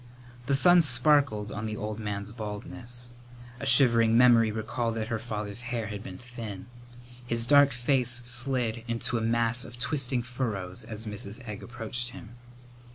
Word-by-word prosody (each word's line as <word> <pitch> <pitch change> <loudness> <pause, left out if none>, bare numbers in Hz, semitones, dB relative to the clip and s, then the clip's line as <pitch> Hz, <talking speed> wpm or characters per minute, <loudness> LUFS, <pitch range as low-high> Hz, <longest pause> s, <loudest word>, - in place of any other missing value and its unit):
The 140 - +3
sun 175 +5 +7
sparkled 125 -5 +4
on 110 +1 -4
the 110 0 -4
old 105 +1 -5
man's 105 -1 -5
baldness. 110 +2 -8 0.5
A 135 - -3
shivering 115 -3 +5
memory 120 -3 +5
recalled 110 +2 -3
that 110 0 -3
her 115 -2 -2
father's 105 -1 -4
hair 120 -2 -2
had 105 -1 -6
been 95 -3 -9
thin. 115 -6 -8 0.6
His 115 -1 0
dark 145 +1 +6
face 120 -1 0
slid 120 -2 0
into 115 0 0
a - - -4
mass 115 +1 0
of 120 -2 -11
twisting 130 -2 -1
furrows 115 -5 -4
as 110 0 -6
Mrs. 105 +3 -5
Egg 105 -2 -6
approached 120 +1 -4
him. 120 -2 -12
115 Hz, 160 wpm, -28 LUFS, 110-125 Hz, 0.6 s, sun